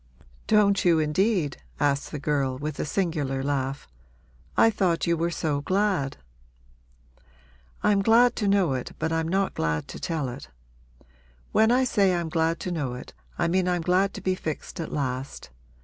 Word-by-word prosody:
'Don't 205 Hz, -2 st, +4 dB
you, 170 Hz, -2 st, +4 dB
indeed?' 160 Hz, 0 st, +1 dB, 0.2 s
asked 140 Hz, -1 st, +1 dB
the 150 Hz, -, -5 dB
girl 140 Hz, -3 st, -1 dB
with 150 Hz, +1 st, -5 dB
a -, -, -1 dB
singular 150 Hz, -6 st, -1 dB
laugh. 135 Hz, 0 st, -2 dB, 0.7 s
'I 225 Hz, -, +6 dB
thought 185 Hz, -5 st, +1 dB
you 170 Hz, -, +2 dB
were 170 Hz, +1 st, 0 dB
so 150 Hz, -4 st, -1 dB
glad.' 185 Hz, -5 st, 0 dB, 1.7 s
'I'm 200 Hz, -1 st, +3 dB
glad 230 Hz, +4 st, +5 dB
to 210 Hz, -, 0 dB
know 195 Hz, -7 st, +3 dB
it 130 Hz, -1 st, -4 dB
but 160 Hz, +1 st, -2 dB
I'm 165 Hz, 0 st, 0 dB
not 190 Hz, +3 st, 0 dB
glad 80 Hz, -1 st, -1 dB
to -, -, -7 dB
tell 160 Hz, -5 st, -2 dB
it. 125 Hz, -, -8 dB, 1.0 s
When 220 Hz, +1 st, +4 dB
I 255 Hz, +2 st, +4 dB
say 200 Hz, -7 st, +2 dB
I'm 170 Hz, -2 st, -2 dB
glad 165 Hz, 0 st, 0 dB
to 180 Hz, -, -3 dB
know 145 Hz, -7 st, -2 dB
it 125 Hz, -, -10 dB, 0.2 s
I -, -, +1 dB
mean 180 Hz, +2 st, +1 dB
I'm 175 Hz, -2 st, 0 dB
glad 185 Hz, +3 st, +2 dB
to -, -, -6 dB
be 185 Hz, -, +1 dB
fixed 160 Hz, 0 st, -5 dB
at 165 Hz, -, -4 dB
last. 130 Hz, -, -4 dB
165 Hz, 170 wpm, -26 LUFS, 145-195 Hz, 1.7 s, I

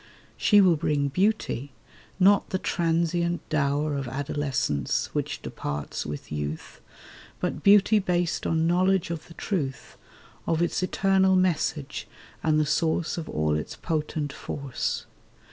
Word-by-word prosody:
She 205 Hz, -1 st, +5 dB
will 180 Hz, -4 st, +5 dB
bring 145 Hz, -2 st, 0 dB
beauty, 180 Hz, -, 0 dB, 0.5 s
not 195 Hz, +2 st, +5 dB
the 185 Hz, -, 0 dB
transient 170 Hz, 0 st, 0 dB
dower 145 Hz, 0 st, +1 dB
Of 135 Hz, -2 st, -3 dB
adolescence 135 Hz, -, -1 dB
which -, -, -3 dB
departs 70 Hz, 0 st, -4 dB
with 75 Hz, +1 st, -7 dB
youth— 75 Hz, -4 st, -5 dB, 0.6 s
But 150 Hz, -, -2 dB
beauty 205 Hz, +3 st, +6 dB
based 175 Hz, -3 st, 0 dB
on 160 Hz, 0 st, +1 dB
knowledge 185 Hz, +1 st, +2 dB
of 165 Hz, -2 st, -5 dB
the 170 Hz, -, -14 dB
truth 140 Hz, -, -3 dB, 0.5 s
Of 165 Hz, -1 st, +1 dB
its 175 Hz, +1 st, 0 dB
eternal 190 Hz, 0 st, +3 dB
message 160 Hz, -8 st, 0 dB, 0.3 s
and 155 Hz, -1 st, +2 dB
the 155 Hz, -, +2 dB
source 160 Hz, +3 st, 0 dB
Of 160 Hz, -, -7 dB
all 75 Hz, 0 st, 0 dB
its 75 Hz, -, -4 dB
potent 150 Hz, -3 st, -2 dB
force. 140 Hz, -3 st, -4 dB
160 Hz, 130 wpm, -26 LUFS, 140-180 Hz, 0.6 s, beauty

